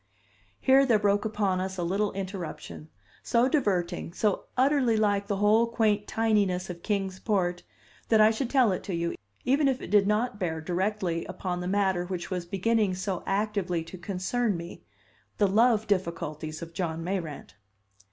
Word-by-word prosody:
Here 270 +1 +5
there 240 -5 +4
broke 205 0 +1
upon 205 -4 0
us 190 0 -4
a 175 - -2
little 200 +4 0
interruption, 175 - -6 0.3
so 240 +1 +2
diverting, 195 - 0
so 205 +1 0
utterly 260 -3 +3
like 205 -2 +1
the 200 - 0
whole 210 +3 +4
quaint 215 -3 +1
tininess 200 -5 +1
of 170 -1 -10
Kings 195 -2 -2
Port, 180 -5 0 0.5
that 220 - +5
I 215 +1 +7
should 230 +2 -2
tell 255 -6 +4
it 185 - -2
to 190 - -3
you, 170 0 -1 0.3
even 275 +3 +3
if 265 -1 +1
it - - -8
did 205 -1 +5
not 210 0 0
bear 165 -4 -2
directly 180 0 -1
upon 180 0 -4
the 180 - -4
matter 190 -2 +1
which 180 0 -5
was 180 -2 -3
beginning 200 +1 +1
so 185 -1 -3
actively 195 -4 -1
to 165 +3 -10
concern 200 +3 -1
me 170 +1 -9 0.6
the 205 - +4
love 220 +2 +3
difficulties 165 -5 -2
of 165 0 -10
John 165 -2 -3
Mayrant. 170 -5 -4
195 Hz, 170 wpm, -28 LUFS, 180-215 Hz, 0.6 s, I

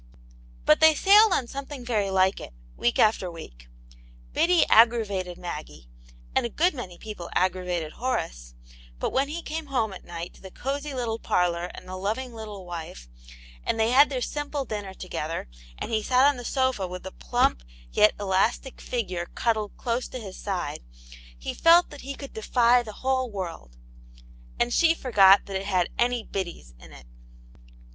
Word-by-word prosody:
But - - +5
they 315 -1 +7
sailed 415 +5 +6
on 265 - +1
something 275 0 -7
very 215 -5 0
like 190 0 +2
it, - - -9 0.2
week 120 - 0
after 215 -4 +3
week. - - -11 0.7
Biddy 345 0 +4
aggravated 210 -6 +3
Maggie, 150 - -8 0.5
and - - +3
a 235 - -2
good 345 - +2
many 190 -10 -7
people 210 -6 -8
aggravated 180 -3 0
Horace, - - -4 0.4
but - - -2
when 270 +1 +1
he 330 +3 -5
came 315 0 -5
home 230 -7 -1
at 185 - -10
night 170 0 -7
to - - -19
the 190 - -9
cosy 280 +6 -4
little 230 -3 -2
parlour 175 0 0
and - - -11
the 185 0 -6
loving 225 +6 -3
little 210 -4 -8
wife, 165 - -8 0.6
and - - -1
they 220 +1 +3
had 280 +4 +6
their 260 -3 -3
simple 290 0 -3
dinner 205 -4 -5
together, 165 - -4 0.3
and - - -5
he 220 -1 +1
sat 255 +4 +3
on 290 0 +4
the 245 - -7
sofa 260 -8 0
with 180 0 -7
the - - -7
plump, - - 0 0.3
yet 210 - +4
elastic 205 +7 0
figure 185 -8 -3
cuddled 215 -3 -1
close 240 +1 -2
to - - -7
his 195 -5 -8
side, 190 -3 -3 0.6
he - - -5
felt 340 +1 +5
that 290 - -10
he 275 +1 -6
could 275 0 -9
defy 240 +2 +3
the 225 -3 -8
whole 260 -1 +1
world, 170 - -7 0.8
and 240 0 +1
she 330 -1 +4
forgot 200 -9 +5
that 195 - -6
it 195 +1 -6
had 185 -3 +1
any 240 -1 +1
Biddys 175 - -5
in - - -14
it. 65 - -14
215 Hz, 175 wpm, -26 LUFS, 180-260 Hz, 0.8 s, they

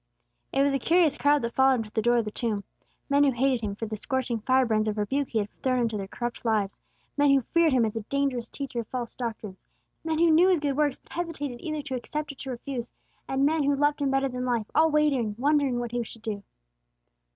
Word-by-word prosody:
It 275 - +2
was 280 0 +2
a 275 - +1
curious 330 +1 +3
crowd 290 -1 +3
that 235 0 -2
followed 265 0 +4
Him 230 - -1
to 215 - -13
the 220 - +1
door 240 +2 +3
of 230 - +1
the 210 - -4
tomb: 215 -3 -2 0.4
men 285 0 +4
who 285 - +5
hated 260 -1 +1
Him 205 -2 -3
for 225 - -4
the 215 0 -4
scorching 250 0 -2
fire 255 +4 +3
brands 215 -2 +1
of 215 0 -1
rebuke 265 +7 -1
He 230 - -2
had 205 -1 0
thrown 255 -1 +1
into 230 -2 0
their 195 -2 -4
corrupt 240 +4 -5
lives; 215 -4 0 0.4
men 290 0 +4
who 275 -1 +5
feared 335 +6 +2
Him 250 -3 +3
as 215 - -3
a 225 - -2
dangerous 270 0 -1
teacher 275 -4 -5
of 230 - -4
false 245 -3 -4
doctrines; 220 -5 -6 0.4
men 320 -1 -1
who 335 0 +4
knew 335 +4 +6
His 365 -3 +3
good 285 -2 -1
works, 290 -2 +1
but - - -25
hesitated 295 -8 -4
either 310 -2 -3
to 270 - -6
accept 280 +1 -5
or - - -3
refuse; 245 -1 -5 0.4
and 270 +1 +1
men 315 +1 +2
who 285 0 +2
loved 290 +1 +1
Him 280 - +2
better 270 0 +2
than 250 -1 -4
life, 240 -4 0
all 320 +1 +5
waiting, 280 -8 +1
wondering 280 -1 +2
what 240 -1 -4
He 240 - -1
would 230 -1 -6
do. 210 -3 -3
260 Hz, 245 wpm, -27 LUFS, 230-285 Hz, 0.4 s, knew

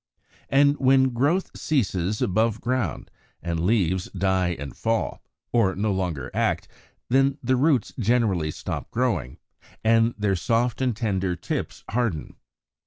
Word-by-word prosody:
And 140 +1 +4
when 130 0 +4
growth 145 +10 +1
ceases 105 - 0
above 110 +3 +1
ground, 120 -7 -2 0.3
and 85 -1 -2
the - - -1
leaves 95 -4 +1
die 95 -2 +1
and 70 0 -7
fall, 115 0 -1 0.3
or 110 -6 +2
no 105 +2 0
longer 85 -9 -3
act, - - 0 0.4
then 135 +2 +3
the 130 +2 +2
roots 135 -3 +2
generally 105 -8 +2
stop - - -5
growing, 105 - -1 0.5
and 115 +1 +3
their 105 -2 +1
soft 115 +7 0
and 125 -5 0
tender 95 -6 -1
tips - - -4
harden. 115 -10 -2
110 Hz, 135 wpm, -25 LUFS, 95-125 Hz, 0.5 s, And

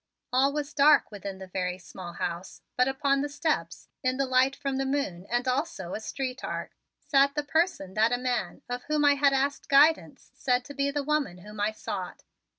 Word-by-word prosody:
All 270 +2 +4
was 295 0 -4
dark 290 -2 +5
within 200 -2 -6
the 190 - -8
very 180 -1 -3
small 175 0 -9
house, 175 +1 -5
but 250 +1 +3
upon 275 0 +1
the 290 - -2
steps, 285 - -2
in 255 0 0
the 275 - +1
light 260 +1 +3
from 275 -1 -3
the 270 - 0
moon 205 -10 -2
and 240 +2 0
also 255 - -2
a - - -3
street 260 +3 -4
arc, - - -4 0.3
sat 280 0 +2
the 295 - 0
person 305 - 0
that 220 +3 +3
a 245 - +2
man, 250 +2 -2
of 245 0 -4
whom 300 -1 +1
I 285 - +7
had 280 0 +3
asked 275 +1 -1
guidance, 295 +3 +3
said 250 -2 0
to 285 - -9
be 280 0 0
the 285 0 -2
woman 295 -10 0
whom 210 +3 -11
I 205 +1 +2
sought. 200 -3 -6
265 Hz, 205 wpm, -28 LUFS, 210-285 Hz, 0.3 s, I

